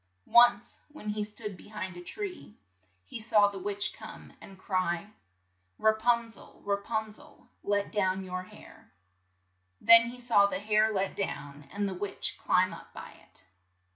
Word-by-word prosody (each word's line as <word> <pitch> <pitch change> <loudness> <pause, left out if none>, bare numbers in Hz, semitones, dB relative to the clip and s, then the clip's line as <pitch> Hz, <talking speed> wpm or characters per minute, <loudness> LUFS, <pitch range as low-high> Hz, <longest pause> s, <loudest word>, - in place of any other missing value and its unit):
Once, 240 0 +4
when 295 -8 -8
he 210 0 -1
stood 210 -1 -5
be - - -15
hind 205 -4 -6
a 175 - -8
tree, 370 - -7 0.5
he 230 - -8
saw 215 -2 +4
the 200 -1 -6
witch 205 +1 -1
come, - - -11
and 195 - -13
cry, 185 0 -2 0.7
"Ra 220 - +4
pun 235 +1 +1
zel, 225 -3 -16
Ra 200 0 +1
pun 220 +1 -3
zel! 210 - -18 0.2
let 205 0 0
down 190 -2 0
your 185 0 -4
hair. 185 - -15 0.3
' 95 -1 -45
' 95 0 -46
Then 230 0 +8
he 245 +1 -8
saw 230 -5 +4
the - - -2
hair 215 +1 +2
let 195 -2 -1
down, 145 -7 -5
and 205 +1 -2
the 195 - -3
witch 195 +2 -4
climb - - +2
up - - -12
by - - -9
it. - - -17
205 Hz, 175 wpm, -29 LUFS, 185-220 Hz, 0.7 s, Then